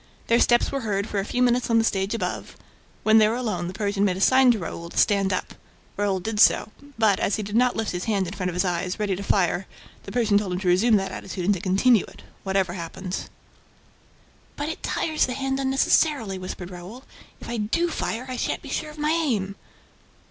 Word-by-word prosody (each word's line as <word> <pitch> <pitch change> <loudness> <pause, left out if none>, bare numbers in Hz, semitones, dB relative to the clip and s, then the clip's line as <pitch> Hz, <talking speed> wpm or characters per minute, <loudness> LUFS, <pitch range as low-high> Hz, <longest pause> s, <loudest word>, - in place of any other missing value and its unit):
Their 235 +1 +3
steps 240 -1 +3
were 275 - -2
heard 200 -2 -1
for 205 - -2
a - - -1
few 250 +3 0
minutes 245 0 +2
on 230 - +4
the 225 - +4
stage 195 0 0
above. - - -4 0.5
When 220 0 +6
they 215 - +5
were 220 - 0
alone 210 -8 -2
the 180 - -6
Persian 205 -2 -1
made 185 -3 +1
a - - -5
sign 260 +5 +5
to 240 - +4
Raoul 170 -2 -6
to - - -11
stand 200 -2 +3
up. 185 - -3 0.4
Raoul 200 -2 0
did 210 +3 -4
so; 215 - +5 0.3
but, 215 -3 +3
as 195 - +1
he 215 - -3
did 205 +1 -5
not 250 +1 +3
lift 220 -1 -2
his 180 0 -4
hand 200 -4 0
in 180 - -6
front 185 -3 -2
of 175 - -5
his 180 +2 +1
eyes, 180 +1 -2
ready 205 -3 0
to 190 - -6
fire, 190 -2 +1 0.3
the 200 - -10
Persian 220 -3 +3
told 195 -3 -3
him 180 - -2
to 190 - -3
resume 205 +6 +4
that 195 -1 0
attitude 185 -2 -5
and 205 - +4
to 190 - -3
continue 200 +5 +3
it, - - -15 0.2
whatever 190 -2 0
happened. 180 +2 -6 1.3
"But 290 +2 -3
it 320 - -6
tires 315 -4 0
the 250 - -3
hand 270 +1 -2
unnecessarily," 265 -5 +1
whispered 185 0 -7
Raoul. 185 +9 -10 0.4
"If - - -10
I 235 - -3
do 225 +11 0
fire, 250 -7 -3
I 255 -1 -5
shan't - - -2
be - - -9
sure 305 - -3
of 300 - -12
my 300 +1 0
aim." 240 - 0
205 Hz, 230 wpm, -24 LUFS, 190-240 Hz, 1.3 s, When